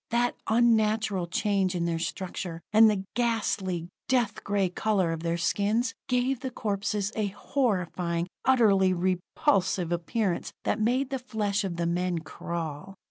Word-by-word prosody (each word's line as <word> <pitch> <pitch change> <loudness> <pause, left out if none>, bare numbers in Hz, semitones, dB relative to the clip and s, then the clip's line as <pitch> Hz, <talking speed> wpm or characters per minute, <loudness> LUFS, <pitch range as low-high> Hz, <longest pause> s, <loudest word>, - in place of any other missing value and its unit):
That 240 +1 +1
unnatural 220 -5 +2
change 190 0 0
in 170 -1 0
their 165 -1 -1
structure, 175 -1 -4
and 220 +1 +8
the 200 -3 0
ghastly, 205 -7 0 0.2
dead 240 -5 +1
gray 200 -2 +1
color 190 -1 0
of 165 -1 -3
their 170 0 -1
skins 210 +7 +1
gave 250 +1 +1
the 260 0 -4
corpses 205 -2 -2
a 215 -2 0
horrifying, 185 - -1 0.2
utterly 200 -7 +4
repulsive 180 0 +1
appearance 175 +2 -1
that 210 - 0
made 255 +5 +1
the 270 - -1
flesh 215 -5 -1
of 185 -3 -3
the 170 0 -1
men 175 +1 0
crawl. 165 +1 -5
200 Hz, 140 wpm, -28 LUFS, 175-225 Hz, 0.2 s, and